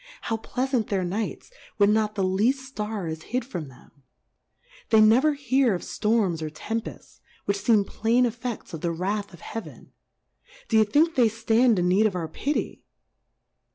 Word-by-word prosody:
How 225 - -2
pleafant 250 0 -1
their 195 -2 0
Nights, 200 - -4 0.3
when 205 0 +4
not 215 -1 0
the 195 - 0
leaft 200 +8 +2
Star 220 -8 -5
is 160 0 -5
hid 250 +1 -1
from 175 - -6
them? 130 -2 -17 1.0
They 220 - +5
never 240 +8 +5
hear 265 -5 +2
of 175 - -6
Storms 210 -7 0
or 155 - -3
Tempefts, 225 +9 -6 0.3
which 200 0 0
feem 205 0 +3
plain 235 +5 +1
Effefts 240 -2 -5
of 160 - -6
the 170 - 0
Wrath 195 +5 -2
of 175 - -14
Heaven. 225 - -8 0.8
D'ye 220 -1 +5
think 310 +10 +3
then 255 - +3
they 225 - +4
ftand 225 +1 +2
in 180 0 +1
need 200 +4 +4
of 200 - -4
our 170 -3 -2
Pitty 290 - -3
215 Hz, 170 wpm, -25 LUFS, 190-240 Hz, 1.0 s, They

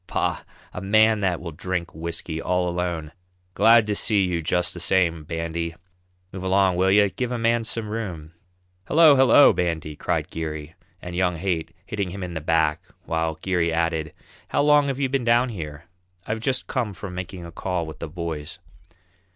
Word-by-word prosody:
Bah! - - -1 0.3
a 90 - -5
man 110 +2 +4
that 95 -4 0
will 85 -1 -6
drink 85 +1 -4
whisky 80 0 -4
all 90 0 0
alone! 85 -3 -3 0.4
Glad 115 +1 +6
to 105 -1 -1
see 100 -1 +3
you 90 -2 -1
just 90 +2 0
the 85 - -7
same, 85 -3 +1
Bandy; 85 +1 -3 0.6
move 95 - -7
along, 95 -1 +2
will 95 +2 +2
you 100 +1 +5
give 125 -1 -3
a 125 - -1
man 115 0 +1
some 110 -1 -2
room." 90 -8 -5 0.5
"Hello, 155 -2 +7
hello, 135 +2 +7
Bandy!" 80 -4 -2
cried - - -2
Geary 80 -2 -5 0.3
and 90 0 -6
young 90 -1 +1
Haight, 85 -2 -3
hitting 100 -3 -3
him 95 +1 -6
in 90 -1 -5
the 80 - -4
back, 80 -1 +1 0.2
while 80 -1 -1
Geary 90 -3 +1
added: 80 -2 -1 0.4
"How - - +1
long 145 -1 +5
have 135 -1 -2
you 140 - +1
been 135 -1 -1
down 120 +2 +3
here? 80 -7 -7 0.4
I've 110 +1 -2
just 130 +3 0
come 115 -6 -2
from 90 +2 -7
making 90 0 -6
a 85 - -9
call 90 0 -3
with 80 - -9
the - - -5
boys. 80 -3 -5
90 Hz, 185 wpm, -24 LUFS, 80-105 Hz, 0.6 s, Hello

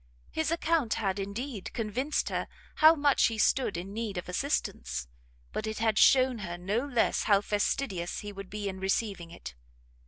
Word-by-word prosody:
His 315 -1 -1
account 325 -6 +1
had, 200 -3 -1
indeed, 205 +2 -5
convinced 245 +7 -1
her - - -2 0.3
how 315 +1 +8
much 285 -2 +3
he 225 - -3
stood 220 -4 +2
in 190 +3 -6
need 215 -3 -3
of 175 - -4
assistance, 70 - -2 0.5
but 215 - -3
it 220 - -3
had 220 -1 +2
shewn 255 -3 +5
her 175 -4 -5
no 200 +7 -1
less 245 -5 +1
how 200 -2 +5
fastidious 205 -3 -1
he 205 0 -7
would 195 -1 -8
be 210 0 -4
in 190 -1 -4
receiving 190 -2 -1
it. 170 - -9
210 Hz, 175 wpm, -29 LUFS, 190-255 Hz, 0.5 s, how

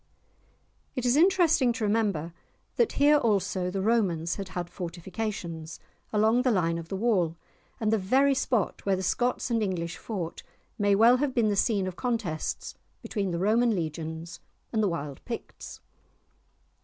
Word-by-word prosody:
It 255 -2 -2
is 245 +1 +3
interesting 330 -6 +4
to 225 - -4
remember 205 -7 0 0.4
that 470 - +2
here 295 +1 +5
also 200 -7 0
the 190 +1 -2
Romans 185 -7 +1
had 195 -2 -5
had 175 -1 -2
fortifications, 175 -2 -5 0.3
along 220 +3 +3
the 255 - +2
line 170 -6 +1
of 165 -1 -9
the - - -3
wall, 190 -6 +1 0.4
and 220 -1 +1
the 220 - +3
very 265 +9 +3
spot 240 -6 -1
where 195 -1 +2
the 190 - -4
Scots 245 +6 0
and 230 -1 +2
English 175 -4 -2
fought 180 -7 -5 0.4
may 205 -1 +3
well 230 +4 +6
have 270 -1 -1
been 230 -3 +3
the 205 - +1
scene 200 -1 +2
of 185 -1 -5
contests 225 -11 -2 0.3
between 200 -4 -2
the 170 - -2
Roman 220 +5 +3
Legions 160 0 -5 0.3
and 220 - +2
the 205 - +2
wild 145 -5 -5
Picts. 235 -2 -8
205 Hz, 160 wpm, -28 LUFS, 170-235 Hz, 0.4 s, well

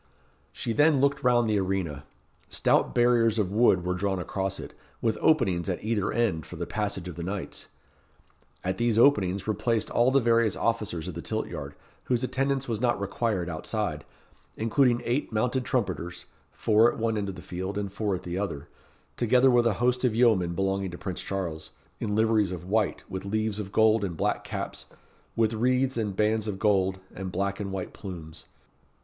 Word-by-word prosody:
She 115 - -3
then 150 +2 +4
looked 140 0 +2
round 120 -2 +4
the 105 -2 +2
arena. 90 -7 -2 0.4
Stout - - +2
barriers 120 -2 +4
of 100 -4 0
wood 100 -5 +3
were 90 - 0
drawn 95 +1 -1
across 95 +2 -2
it, - - -8 0.3
with 110 -2 +1
openings 100 - +2
at 90 - -3
either 105 -3 0
end 110 -10 0
for - - -9
the - - -4
passage 100 -4 -3
of 90 -2 -7
the - - -4
knights. 95 +2 -5 1.0
At 95 +1 -1
these 120 -2 +1
openings 100 -7 +4
were 110 - 0
placed 110 +1 0
all 120 +2 +4
the 135 +1 +4
various 115 -3 +3
officers 105 -8 -1
of - - -4
the - - -6
tilt - - -2
yard, - - -6 0.3
whose 125 -1 0
attendance 135 +1 0
was 115 -2 -2
not 120 -3 +2
required 100 -2 -1
outside, 80 -1 -3 0.5
including 120 +2 +2
eight 125 +4 -1
mounted 125 +3 0
trumpeters, 95 -8 -2 0.3
four 110 +2 +4
at - - -9
one 115 0 0
end 100 -2 -2
of 95 - -6
the 90 - -9
field, 95 +2 -4
and 100 -1 -3
four 100 -2 -1
at 90 - -7
the 90 +1 -3
other, 85 -8 -4 0.5
together 125 +2 +4
with 120 -1 +4
a 115 - +2
host 125 +3 +1
of 120 -4 +2
yeomen 105 -8 +3
belonging 95 +1 0
to 85 - -8
Prince 95 -1 -5
Charles, 90 -5 -4 0.3
in 105 -2 -2
liveries 110 -3 +3
of 90 -1 -6
white, 105 +3 0
with 95 0 -5
leaves 110 +1 -1
of 100 -2 -5
gold, 110 0 +4
and 90 -5 -3
black - - 0
caps, - - -5 0.5
with 115 -1 +2
wreaths 130 +3 +1
and 105 -4 -2
bands 110 +1 +1
of 100 -3 -3
gold, 95 -2 +2
and 95 -1 -5
black 100 +1 -2
and 100 -2 -4
white 95 -2 -5
plumes. 85 -4 -9
105 Hz, 190 wpm, -27 LUFS, 95-115 Hz, 1.0 s, then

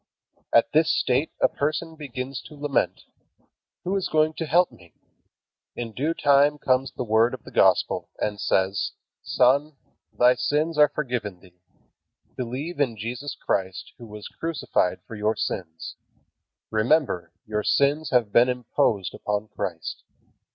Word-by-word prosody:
At 115 - +4
this 160 +1 +4
state 130 +5 +1
a - - +5
person 155 +3 -2
begins 135 -3 -6
to 150 - -13
lament: 145 -1 -1 0.8
"Who 190 +2 -1
is 195 - 0
going 155 0 +2
to 165 - -2
help 175 +3 +3
me?" 85 -8 -19 0.8
In 115 -1 -5
due 150 +8 -1
time 145 0 +4
comes 130 -1 +1
the - - -4
Word 110 +1 +3
of - - -15
the - - -12
Gospel, - - +2
and 105 -1 -2
says: 95 +1 +1 0.3
"Son, 140 +4 +2 0.4
thy 125 +1 +5
sins 145 +6 0
are 150 -1 +7
forgiven 125 -10 -3
thee. 90 -1 -21 0.7
Believe 130 +7 -4
in 125 -6 +1
Jesus 125 +7 -5
Christ 95 -1 -2
who 120 - -10
was 105 -1 -9
crucified 160 - -1
for - - -11
your 105 +1 0
sins. 80 -3 -5 0.7
Remember, 110 - +1
your 105 0 -1
sins 145 +5 +2
have 120 -5 +2
been 120 +2 +6
imposed 115 -5 0
upon 105 +1 -3
Christ." 80 -3 -5
125 Hz, 145 wpm, -25 LUFS, 105-150 Hz, 0.8 s, are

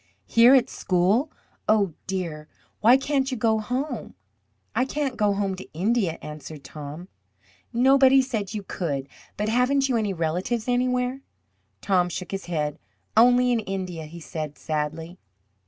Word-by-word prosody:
"Here 235 +3 +6
at 260 - +4
school 195 - +1 0.4
oh, 205 -5 +3
dear! 170 -5 -4 0.3
Why 240 +4 +6
can't 270 -1 0
you 255 - -3
go 220 0 +2
home?" 250 +7 -4 0.6
"I - - +2
can't 275 -1 -2
go 210 -3 +2
home 200 -1 -1
to 190 - -11
India," 195 -1 +1
answered 150 -1 -8
Tom. 150 +5 -8 0.6
"Nobody 265 +2 +5
said 220 -5 -3
you 205 - -4
could. 145 -8 -3 0.3
But 210 - -1
haven't 260 +4 +2
you 245 - +2
any 210 -3 0
relatives 180 +8 -1
anywhere?" 250 +1 0 0.6
Tom 180 -3 +2
shook 180 +1 -6
his 195 0 -4
head. 150 -3 -2 0.4
"Only 245 +2 +5
in 235 - +2
India," 185 -5 -4
he 170 +3 -10
said 155 -3 -6
sadly. 160 +3 -4
205 Hz, 145 wpm, -25 LUFS, 170-250 Hz, 0.6 s, Here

